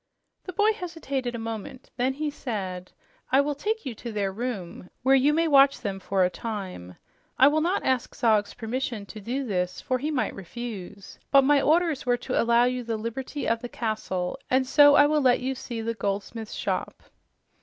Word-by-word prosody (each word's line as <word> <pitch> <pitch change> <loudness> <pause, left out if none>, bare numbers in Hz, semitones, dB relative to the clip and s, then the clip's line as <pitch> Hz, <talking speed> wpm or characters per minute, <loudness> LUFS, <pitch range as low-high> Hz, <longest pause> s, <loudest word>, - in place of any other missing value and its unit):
The 365 - -6
boy 420 +4 +3
hesitated 295 - -4
a - - -3
moment. 225 +2 -7
Then 255 +2 0
he 300 +2 -3
said, 190 -9 -5 0.4
"I 265 - +5
will 290 +1 +1
take 430 +7 -3
you 260 - -3
to 235 +2 -7
their 200 -2 -1
room, 190 -6 -5
where 265 +1 +4
you 270 +2 +5
may 330 +2 +2
watch 275 -2 +5
them 195 -3 -3
for 190 0 +1
a - - +1
time. 185 - -6 0.4
I 265 - +7
will 305 +2 +3
not 355 +5 0
ask 260 -2 0
Zog's 215 -3 +2
permission 240 -2 -3
to 215 +1 -10
do 255 +6 -3
this, 180 -5 -2
for 255 -1 -1
he 295 +4 -2
might 285 -5 -1
refuse. 200 -1 -8
But 275 -1 +6
my 285 +1 +4
orders 325 -1 +2
were 245 -1 +2
to 250 +1 -1
allow 235 +1 +4
you 250 0 0
the 225 -1 -2
liberty 255 +6 -4
of 230 0 +1
the 245 - -6
castle, 215 -6 -3
and 260 +1 +3
so 290 +2 +7
I 290 - +7
will 300 0 +2
let 255 -2 +4
you 260 +1 -2
see 240 -3 -6
the 230 +1 -2
goldsmiths' 210 +1 -4
shop." - - -3
245 Hz, 195 wpm, -26 LUFS, 215-280 Hz, 0.4 s, I